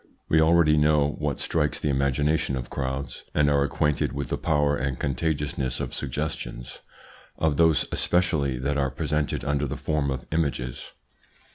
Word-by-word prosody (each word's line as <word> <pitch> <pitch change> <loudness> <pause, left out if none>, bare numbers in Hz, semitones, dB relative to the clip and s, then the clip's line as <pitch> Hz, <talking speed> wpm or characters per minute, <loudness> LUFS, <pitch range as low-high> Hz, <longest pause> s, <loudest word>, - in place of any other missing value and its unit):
We 80 - +4
already 80 -1 +4
know 75 -1 +3
what 75 -3 -2
strikes 75 -3 0
the 75 - 0
imagination 70 +2 +1
of 60 -2 -6
crowds, 65 -1 -4
and 75 -1 +3
are 70 -1 +3
acquainted 75 +1 0
with 70 -2 -4
the - - -1
power 75 -2 +2
and 65 -1 -2
contagiousness 70 -2 -1
of - - -4
suggestions, 65 -3 -4 0.6
of 80 -3 +1
those 80 -3 +4
especially 75 -7 +1
that 70 +3 -1
are 70 -1 +1
presented 75 +1 -2
under 75 0 0
the 70 +3 -4
form 75 -2 -1
of 65 -2 -4
images. 70 -6 -2
75 Hz, 155 wpm, -25 LUFS, 70-75 Hz, 0.6 s, We